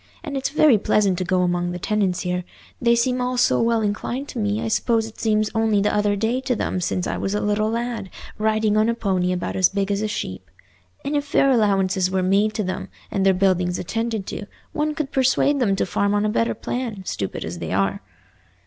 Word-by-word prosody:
And 285 - -5
it's 270 - -1
very 290 -6 +4
pleasant 200 -3 +2
to - - 0
go 180 +1 +1
among 175 0 0
the - - -4
tenants 190 -1 0
here—they 180 +6 -2
seem 250 +1 +1
all 250 0 -1
so 245 - +3
well 230 -1 +2
inclined 235 +6 -2
to 245 - -5
me 205 0 0
I - - -2
suppose 225 0 +1
it 225 - -11
seems 215 -1 +1
only 220 -2 +2
the 205 +1 +1
other 210 -1 +2
day 225 +5 0
to 260 -1 0
them 185 -3 -2
since 180 +1 -1
I - - -2
was 195 +1 -2
a - - +1
little 210 +1 +1
lad, 230 -3 -3 0.3
riding 215 0 +2
on 215 +1 +3
a 235 - +1
pony 185 -5 0
about 180 -1 -3
as 185 -2 +4
big 200 0 -1
as 200 0 0
a 215 - 0
sheep. 95 - -5 0.6
And 285 +2 -1
if 290 - +1
fair 275 -1 +3
allowances 195 -5 +2
were 185 0 0
made 200 +3 +2
to 215 - 0
them, 185 0 -4 0.2
and 195 - 0
their 190 -1 +4
buildings 180 -2 +1
attended 225 +1 -2
to, 205 - -6 0.3
one 300 0 -1
could 305 -3 -3
persuade 270 +2 +2
them 205 -6 +2
to - - 0
farm 200 0 0
on 205 +1 +1
a - - +1
better 115 - 0
plan, 230 -6 -4
stupid 100 - -4
as 85 +1 -6
they 80 -2 -5
are." 95 +1 0
210 Hz, 225 wpm, -22 LUFS, 185-235 Hz, 0.6 s, very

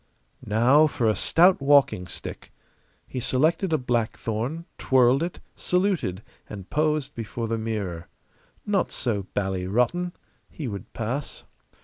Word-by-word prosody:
Now 125 +9 +5
for 120 -6 -1
a 110 - +3
stout 175 - +4
walking 140 -10 +4
stick. - - -8 0.5
He 130 - -5
selected 155 +9 +1
a 155 - +3
blackthorn, 120 +4 -2
twirled 130 +1 +4
it, 170 +1 -3 0.2
saluted, 180 - 0 0.3
and 100 -3 -8
posed 150 -2 0
before 115 0 -4
the 115 0 -1
mirror. 100 -7 -4 0.6
Not 205 -2 0
so 105 -6 -2
bally 95 -2 -1
rotten. 125 - +1 0.4
He 150 - -6
would 100 -4 -7
pass. 125 +6 -4
125 Hz, 125 wpm, -25 LUFS, 110-155 Hz, 0.6 s, Now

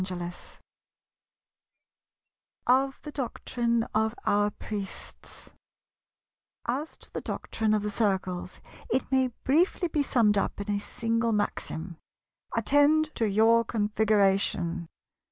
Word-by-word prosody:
§ 185 - -2
12 175 0 -8 2.1
Of 265 +2 +3
the 300 - -7
Doctrine 235 -3 -1
of 220 +1 +1
our 205 0 +3
Priests 205 -1 -8 1.1
As 275 +6 -3
to - - -17
the - - -3
doctrine 220 -1 -1
of 210 - -1
the 210 - -2
Circles 190 -4 -1 0.3
it 265 - 0
may 260 -1 +3 0.2
briefly 350 +6 +2
be 300 - +1
summed 225 -7 +3
up - - -2
in 205 +1 -3
a 205 - 0
single 230 +2 -1
maxim, 180 -4 -3 0.6
"Attend 300 +2 +3
to 225 -2 0
your 225 +3 +5
Configuration." 200 -6 +1
220 Hz, 115 wpm, -28 LUFS, 205-255 Hz, 2.1 s, your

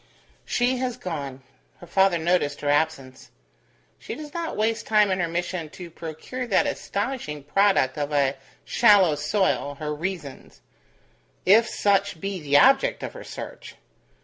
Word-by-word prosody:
"She 245 +1 +1
has 250 -1 -2
gone." 140 - -6 0.4
Her - - -11
father 190 +1 +3
noticed 165 -3 0
her 145 - -1
absence. 145 -3 -1 0.7
"She - - -7
does 300 +2 -9
not 335 -1 -4
waste 220 +1 0
time 210 -2 +4
in 185 - 0
her 170 - +1
mission 170 -1 -3
to 175 -2 -9
procure 165 +11 -6
that 200 - +3
astonishing 200 - -3
product 150 -4 +2
of 145 0 -2
a 140 -2 +2 0.3
shallow 205 -8 +5
soil, 150 -1 0
her 150 +1 -4
reasons; 155 - -6 0.8
if 220 +4 +5
such 200 -3 +1
be 195 +1 -4
the 145 -1 +3
object - - +4
of - - -5
her - - -9
search. - - -9
175 Hz, 150 wpm, -24 LUFS, 150-205 Hz, 0.8 s, shallow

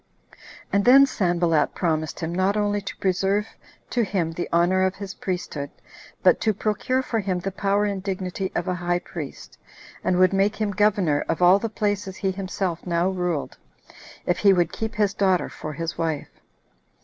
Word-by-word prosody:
And 200 0 +3
then 270 +4 +8
Sanballat 175 - +1
promised 155 -2 -1
him 165 +1 -3
not 190 +3 +1
only 205 0 0
to 200 - -7
preserve 195 +2 +1 0.5
to 240 - +2
him 185 -5 -1
the 175 +2 -4
honor 175 +2 +3
of 190 0 +1
his 200 -1 -7
priesthood, 170 -6 -4 0.5
but - - +5
to 215 -2 +1
procure 220 +6 0
for 230 -3 -1
him 190 -3 -1
the 195 +2 -3
power 200 +2 +1
and 200 -2 -2
dignity 190 -1 -3
of 175 - -1
a 185 - +1
high 175 0 0
priest, 165 -5 -8 0.4
and 180 - +1
would 185 +1 +4
make 195 +2 +2
him 215 -2 -1
governor 195 -7 +2
of 170 - 0
all 180 +3 +7
the 230 - -3
places 205 -2 -2
he 190 0 -1
himself 185 -2 -3
now 170 +1 +1
ruled, 180 -5 -2 0.7
if 175 - 0
he 200 -1 +6
would 175 -2 +2
keep 220 0 -4
his 205 -1 +1
daughter 190 -3 +1
for 155 - -7
his 165 +3 -4
wife. 160 -3 -2
190 Hz, 180 wpm, -24 LUFS, 175-205 Hz, 0.7 s, then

